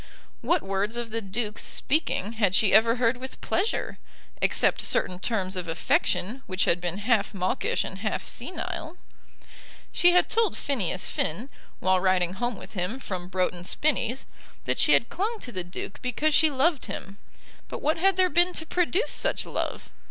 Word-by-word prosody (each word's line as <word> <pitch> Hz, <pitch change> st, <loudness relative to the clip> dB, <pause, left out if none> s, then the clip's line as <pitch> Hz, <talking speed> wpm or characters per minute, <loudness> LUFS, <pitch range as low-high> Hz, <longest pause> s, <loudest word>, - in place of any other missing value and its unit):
What 345 Hz, -2 st, +1 dB
words 200 Hz, +4 st, -1 dB
of 235 Hz, -2 st, -4 dB
the 230 Hz, +1 st, -2 dB
Duke's 210 Hz, +2 st, -3 dB
speaking 250 Hz, -, 0 dB
had 205 Hz, -5 st, +2 dB
she 205 Hz, -1 st, +4 dB
ever 230 Hz, +2 st, +6 dB
heard 245 Hz, 0 st, +1 dB
with 260 Hz, +1 st, -8 dB
pleasure, 405 Hz, +6 st, -1 dB, 0.4 s
except -, -, +2 dB
certain 180 Hz, -1 st, +1 dB
terms 190 Hz, -3 st, -2 dB
of 180 Hz, -2 st, -4 dB
affection 185 Hz, +7 st, 0 dB
which 185 Hz, -1 st, 0 dB
had 175 Hz, +1 st, +2 dB
been 175 Hz, +1 st, -2 dB
half 210 Hz, -1 st, +1 dB
mawkish 185 Hz, -1 st, 0 dB
and 190 Hz, -, -7 dB
half 215 Hz, 0 st, -2 dB
senile? 340 Hz, +3 st, -4 dB, 0.9 s
She 350 Hz, 0 st, +4 dB
had 360 Hz, -, +4 dB
told 450 Hz, -5 st, +1 dB
Phineas 240 Hz, -, -1 dB
Finn, 210 Hz, -, -2 dB, 0.3 s
while 185 Hz, 0 st, +3 dB
riding 185 Hz, -1 st, +2 dB
home 240 Hz, +4 st, -2 dB
with -, -, -11 dB
him 185 Hz, +5 st, -2 dB
from 185 Hz, -8 st, -5 dB
Broughton 180 Hz, -1 st, -1 dB
Spinnies, 260 Hz, +2 st, 0 dB, 0.4 s
that -, -, 0 dB
she -, -, +5 dB
had -, -, +3 dB
clung 435 Hz, +4 st, -2 dB
to 245 Hz, -, -6 dB
the 185 Hz, -5 st, -3 dB
Duke 175 Hz, +2 st, -7 dB
because 280 Hz, +5 st, 0 dB
she 315 Hz, +1 st, +5 dB
loved 290 Hz, +2 st, +1 dB
him, 195 Hz, -1 st, -7 dB, 0.5 s
but -, -, -6 dB
what 310 Hz, +2 st, +2 dB
had 380 Hz, +2 st, +3 dB
there 370 Hz, 0 st, +5 dB
been 350 Hz, +4 st, +4 dB
to 320 Hz, -, -4 dB
produce 360 Hz, +6 st, +1 dB
such -, -, +2 dB
love? -, -, -4 dB
230 Hz, 175 wpm, -26 LUFS, 190-310 Hz, 0.9 s, ever